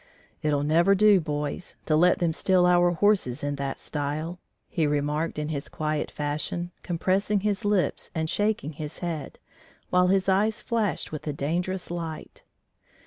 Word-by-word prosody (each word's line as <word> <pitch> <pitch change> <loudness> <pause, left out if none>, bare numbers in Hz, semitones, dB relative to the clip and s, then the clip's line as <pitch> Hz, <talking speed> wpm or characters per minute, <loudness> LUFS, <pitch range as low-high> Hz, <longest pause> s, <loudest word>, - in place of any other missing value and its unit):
"It'll 145 -2 +1
never 170 +6 +4
do, 210 -1 +6
boys, 150 +2 -4
to 155 - +2
let 175 +3 +5
them 170 -2 +1
steal 185 +1 +3
our 175 0 +5
horses 175 - +2
in 145 0 -1
that 140 -1 -3
style," 155 +4 -3 0.3
he 160 -3 0
remarked 150 +2 -1
in 150 0 -2
his 140 -3 -4
quiet 155 -1 -2
fashion, 155 +4 -3
compressing 190 +4 0
his 205 -1 -1
lips 205 -3 0
and 160 -1 0
shaking 205 -4 0
his 150 0 -7
head, 160 -4 -4 0.5
while 180 0 +4
his 190 0 +2
eyes 205 +3 +2
flashed 225 -4 -1
with 155 0 -6
a 150 - -1
dangerous 175 +6 -2
light. 165 -3 -6
165 Hz, 155 wpm, -26 LUFS, 150-185 Hz, 0.5 s, do